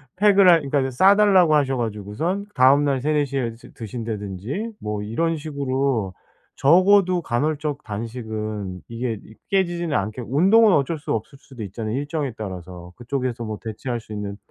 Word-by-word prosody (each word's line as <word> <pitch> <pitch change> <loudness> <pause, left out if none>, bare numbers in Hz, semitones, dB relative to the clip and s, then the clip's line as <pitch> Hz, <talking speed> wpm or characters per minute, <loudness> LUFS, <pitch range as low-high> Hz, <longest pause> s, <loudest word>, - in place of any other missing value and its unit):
팩을 200 -1 +5
할 165 -2 +6
그러니까 140 -1 0
싸달라고 190 +3 +5
하셔 135 -3 +2
가지고선 115 - -3
다음날 135 +1 +4
3-4 150 +1 +1
시에 130 -4 -2
드 - - -16
드신다든지 110 - -5
뭐 105 -1 -4
이런 165 +10 -1
식으로 135 - -2 0.4
적어도 185 +4 +4
간헐적 150 +2 -2
단식은 110 -3 -5
이게 115 -2 -4
이 110 - -15 0.2
깨지지는 175 -5 0
않게 105 +5 -2
운동은 195 - +5
어쩔 150 +3 +1
수 145 - -6
없을 135 +6 -4
수도 130 -4 -12
있잖아요, 110 +3 -4
일정에 145 -1 -3
따라서. 90 -3 -8
그쪽에서 125 -1 -3
뭐 110 -2 -5
대체할 115 +2 -4
수 110 - -11
있는 100 -1 -5
130 Hz, 345 characters per minute, -22 LUFS, 110-155 Hz, 0.4 s, 할